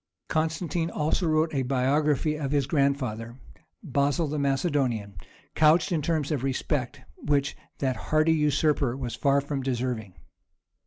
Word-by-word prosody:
Constantine 160 +1 -1
also 160 +3 0
wrote 155 +1 +2
a 135 - +1
biography 140 +4 +1
of 145 -3 -3
his 140 -1 +1
grandfather, 130 -6 -1 0.5
Basil 145 +1 +1
the 150 +1 -2
Macedonian, 135 - 0 0.4
couched 155 +5 +4
in 165 -3 +1
terms 155 -1 -1
of 140 -4 -1
respect 135 0 -2 0.2
which 140 -1 0 0.2
that 130 -4 -1
hardy 155 +6 +2
usurper 150 -4 +1
was 125 -3 -4
far 140 0 +2
from 140 -1 -3
deserving. 120 -6 -3
140 Hz, 135 wpm, -27 LUFS, 130-155 Hz, 0.5 s, couched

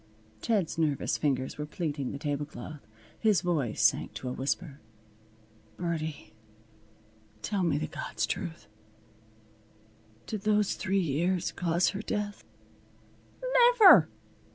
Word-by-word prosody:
Ted's 195 -8 0
nervous 150 -4 +1
fingers 135 -2 -1
were 150 - -2
pleating 150 -4 -3
the - - -5
tablecloth. 145 -3 -5 0.3
His 210 -7 +3
voice 140 - -1
sank 110 -1 +2
to 120 +4 -5
a - - -3
whisper. 140 +2 -3 1.0
"Birdie, 160 -9 -4 1.1
tell 205 -2 -1
me 165 -5 +1
the 155 - -2
God's - - -3
truth. 160 - -5 1.6
Did 215 -3 -4
those 210 -1 +2
three 195 -1 -1
years 175 +2 0
cause 175 0 +1
her 200 - -4
death?" 210 -1 -4 1.3
"Niver!" 415 -5 +9
160 Hz, 110 wpm, -29 LUFS, 140-190 Hz, 1.6 s, Niver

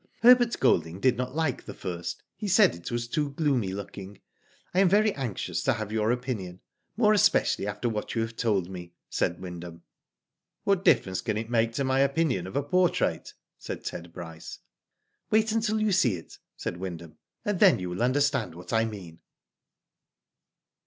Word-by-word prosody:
Herbert 245 -1 +6
Golding 85 -8 +2
did 130 +4 +3
not 125 +2 -4
like 160 -5 -1
the - - -7
first. 90 0 -5
He 210 - -5
said 200 0 +5
it 85 - -8
was 120 0 -2
too 145 +2 -1
gloomy 135 -10 0
looking. 100 0 -8 0.5
I 185 - +2
am 195 -2 +5
very 210 +2 +4
anxious 125 -8 -3
to 135 - +2
have 110 -3 -5
your 110 0 +1
opinion, 115 -8 -3 0.4
more 215 -2 +5
especially 205 - +3
after 105 +4 -2
what 110 -1 -3
you 115 - +1
have 115 0 -6
told 105 -7 0
me," 90 -2 -9 0.2
said 85 - 0
Wyndham. 85 -2 -8 0.8
"What 195 -2 +1
difference 100 - +3
can 110 -1 -2
it 115 +2 -5
make 115 -1 +2
to 140 - -1
my 130 0 +1
opinion 140 - +1
of 95 - -9
a 140 - +1
portrait?" 180 +4 +1 0.2
said - - -6
Ted 85 0 -6
Bryce. 80 -2 -9 0.4
" - - -51
Wait 220 0 +3
until 220 -1 +1
you 215 -1 +1
see 140 - +3
it," 85 - -12 0.2
said 85 - -4
Wyndham, 85 -3 -7
" - - -48
and 205 -3 -1
then 195 -4 +6
you 90 -1 -5
will 90 - -4
understand 140 - +1
what 90 +6 -8
I 115 0 +3
mean." 95 -7 -8
115 Hz, 180 wpm, -27 LUFS, -, 0.8 s, Herbert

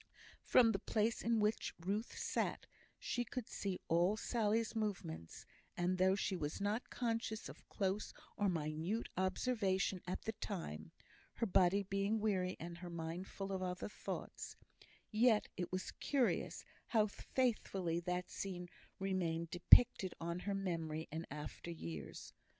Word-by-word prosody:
From 235 -2 +6
the 195 - 0
place 220 +1 +1
in 230 -1 +2
which 210 +1 +1
Ruth 200 +7 -2
sat - - -1 0.3
she 245 - -1
could 240 0 -5
see 195 -2 -2
all 175 +5 +3
Sally's 225 -1 +1
movements; 180 - -3 0.3
and 180 +1 +1
though 190 +1 +5
she 195 -1 0
was 150 -4 -3
not 205 +4 -1
conscious 225 -2 -1
of - - -12
close 195 +1 -1 0.2
or 205 -1 +2
minute 165 +6 -1
observation 190 -1 +1
at 180 - -3
the 220 - -1
time 170 - -5 0.4
(her - - +1
body 190 0 +4
being 195 +3 0
weary, 190 -4 +1
and 170 +1 -6
her 175 -1 -6
mind 170 +2 -4
full 195 0 -5
of 190 -1 -1
other 180 +2 -2
thoughts), - - -5 0.6
yet 220 -1 +4
it 180 - -3
was 185 0 -2
curious 270 -4 0 0.2
how 220 -3 +4
faithfully 200 -7 0
that 180 +1 -2
scene 180 -2 -4 0.3
remained 170 -4 -1
depicted 185 +1 +7
on 170 +1 -2
her 200 +2 -2
memory 165 -5 -2
in 160 +2 -4
after 150 +3 -6
years. 85 - -6
190 Hz, 145 wpm, -38 LUFS, 175-215 Hz, 0.6 s, depicted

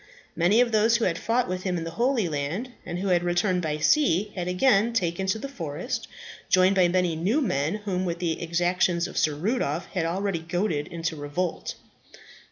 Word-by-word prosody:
Many 190 +8 +4
of 245 -1 +2
those 220 +2 +4
who 235 - 0
had 170 -2 0
fought 240 +2 +1
with 185 0 -3
him 185 -2 -1
in 165 - -3
the 165 - -5
Holy 235 0 +1
Land, 160 - -3 0.2
and 175 0 -3
who 195 +2 -2
had 175 -1 +3
returned 175 +1 +1
by 155 -2 -2
sea, 210 - +2
had 180 -2 -4
again 210 +4 +3
taken 185 -3 -1
to 190 - +1
the 250 - -5
forest, 170 - -5 0.4
joined 185 +1 +4
by 185 -2 +5
many 180 -1 +1
new 190 - +1
men 180 - 0
whom 185 -2 -1
the 170 -2 -2
exactions 175 +1 +1
of - - -11
Sir 150 -1 +1
Rudolph 175 - -1
had 175 -4 0
already 190 +1 -1
goaded 165 -2 -2
into 165 -2 -3
revolt. 155 +4 -3
180 Hz, 190 wpm, -26 LUFS, 165-210 Hz, 0.4 s, by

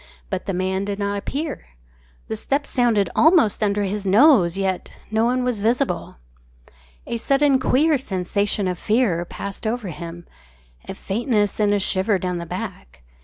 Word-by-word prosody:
But - - -3
the 195 - -1
man 190 +1 -1
did 200 0 -3
not 200 0 -2
appear. 290 +7 -4 0.6
The - - -3
steps 280 - -2
sounded 235 -6 +2
almost 320 - +4
under 205 -1 +1
his 200 +1 -2
nose, 200 - +5
yet 190 -2 -2 0.2
no 220 +1 +2
one 250 +1 +1
was 245 -5 -1
visible. 245 +5 0 0.9
A 235 - -3
sudden 275 +2 +3
queer 295 +3 +2
sensation 200 -2 -1
of 180 -1 -3
fear 210 -7 +1
passed 200 +4 -6
over 225 -3 -2
him 170 +1 -8 0.6
a - - -5
faintness 210 -1 -1
and 210 -1 +3
a 205 - +2
shiver 195 +1 +1
down 180 -1 -3
the 170 - -6
back. 60 - -7
205 Hz, 160 wpm, -22 LUFS, 190-245 Hz, 0.9 s, nose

